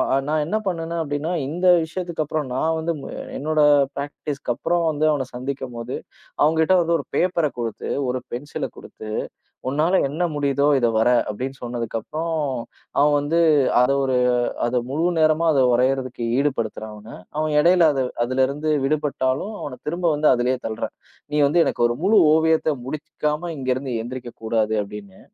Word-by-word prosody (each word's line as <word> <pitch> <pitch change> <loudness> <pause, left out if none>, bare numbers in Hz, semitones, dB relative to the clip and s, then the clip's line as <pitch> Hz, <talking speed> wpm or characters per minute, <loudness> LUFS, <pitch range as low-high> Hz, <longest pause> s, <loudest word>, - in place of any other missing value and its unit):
அ - - +3
நான் 155 0 +1
என்ன 195 +8 0
பண்ணேன்னா 170 -2 -2
அப்படின்னா, 145 +2 -3 0.2
இந்த 175 +5 -1 0.2
விஷயத்துக்கப்புறம் 160 -3 -3
நான் 160 +5 +1
வந்து 165 +1 -1
ம் - - -8 0.3
என்னோட 155 +1 0 0.3
பிராக்டிஸ்க்கு 140 -2 -4
அப்புறம் 175 +7 0
வந்து 155 0 +1
அவன 135 -4 -1
சந்திக்கும்போது, 125 -2 -5 0.5
அவன்கிட்ட 160 +4 +4
வந்து 170 0 +1
ஒரு 140 - -6
பேப்பர 170 -4 +2
குடுத்து, 115 -2 -4 0.2
ஒரு 125 0 -2
பென்சில 140 +5 -4
குடுத்து, 110 - -10 0.6
"உன்னால 160 +7 +2
என்ன 160 +6 -1
முடியுதோ 140 0 +1
இத 120 -1 +3
வர" 110 - +3 0.2
அப்படின்னு 130 +6 -4
சொன்னதுக்கப்புறம், 120 +7 -3 0.6
அவன் 145 +1 +4
வந்து 155 +4 +1 0.4
அத 125 - +3
ஒரு 130 -1 +1 0.5
அத 125 0 0
முழு 155 +4 0
நேரமா 155 +1 +3
அத 135 -2 +4
வரையறதுக்கு 130 -1 0 0.2
ஈடுபடுத்துறேன் 115 -6 -2
அவன. 105 +2 -13 0.3
அவன் 155 0 0
இடையில 170 0 +5
அது 135 - +1 0.2
அதுலருந்து 135 +4 0 0.2
விடுபட்டாலும், 145 +4 -1
அவனத் 130 -3 -8
திரும்ப 175 +3 -2
வந்து 150 +1 +3
அதுலயே 125 +2 0
தள்றேன். 110 -1 -4 0.4
"நீ 150 - -2
வந்து 170 +4 +3
எனக்கு - - 0
ஒரு 120 - -1
முழு 210 +3 +4 0.2
ஓவியத்த 160 0 +2 0.2
முடிச்சுக்காம 150 +3 -3
இங்கருந்து 130 0 -2
எந்திரிக்கக் 120 +1 -8
கூடாது." 110 -1 +1
அப்படின்னு. 100 -1 -9
145 Hz, 150 wpm, -22 LUFS, 125-160 Hz, 0.6 s, இடையில